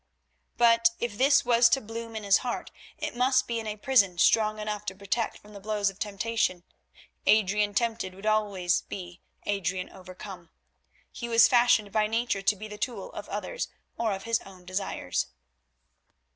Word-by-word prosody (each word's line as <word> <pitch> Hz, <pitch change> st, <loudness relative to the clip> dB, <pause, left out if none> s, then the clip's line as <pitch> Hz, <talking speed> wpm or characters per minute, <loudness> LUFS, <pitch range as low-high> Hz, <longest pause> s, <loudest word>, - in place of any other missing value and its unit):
But 230 Hz, -1 st, +5 dB
if 240 Hz, -3 st, -3 dB
this 275 Hz, +5 st, +4 dB
was 235 Hz, 0 st, +5 dB
to 270 Hz, -, +3 dB
bloom 230 Hz, 0 st, -7 dB
in 215 Hz, -, -4 dB
his 200 Hz, -1 st, +4 dB
heart, 245 Hz, -1 st, -4 dB, 0.3 s
it -, -, -4 dB
must 255 Hz, +1 st, +3 dB
be 235 Hz, -1 st, -1 dB
in 220 Hz, -, -6 dB
a 210 Hz, 0 st, -4 dB
prison 205 Hz, -7 st, +3 dB
strong 215 Hz, +3 st, +4 dB
enough 210 Hz, -1 st, -4 dB
to 190 Hz, -, -3 dB
protect 200 Hz, +4 st, -2 dB
from 210 Hz, 0 st, -17 dB
the 200 Hz, -, -9 dB
blows 205 Hz, 0 st, 0 dB
of 195 Hz, -, -21 dB
temptation. 205 Hz, -3 st, -1 dB, 0.6 s
Adrian 210 Hz, -1 st, +3 dB
tempted 225 Hz, -5 st, -1 dB
would 195 Hz, +2 st, -11 dB
always 200 Hz, -5 st, +1 dB
be 180 Hz, -2 st, -8 dB, 0.2 s
Adrian 190 Hz, -2 st, -2 dB
overcome. 185 Hz, -1 st, -10 dB, 0.6 s
He 235 Hz, -, -6 dB
was 230 Hz, -1 st, +7 dB
fashioned 235 Hz, -4 st, +4 dB
by 215 Hz, +1 st, +2 dB
nature 225 Hz, -2 st, -1 dB
to 200 Hz, +2 st, +2 dB
be 215 Hz, +2 st, -8 dB
the 210 Hz, 0 st, -9 dB
tool 250 Hz, -, -4 dB
of -, -, -8 dB
others -, -, -3 dB, 0.3 s
or 230 Hz, -2 st, 0 dB
of 195 Hz, -1 st, -4 dB
his 230 Hz, 0 st, +1 dB
own 185 Hz, -2 st, -15 dB
desires. 185 Hz, +2 st, -2 dB
215 Hz, 170 wpm, -28 LUFS, 195-230 Hz, 0.6 s, was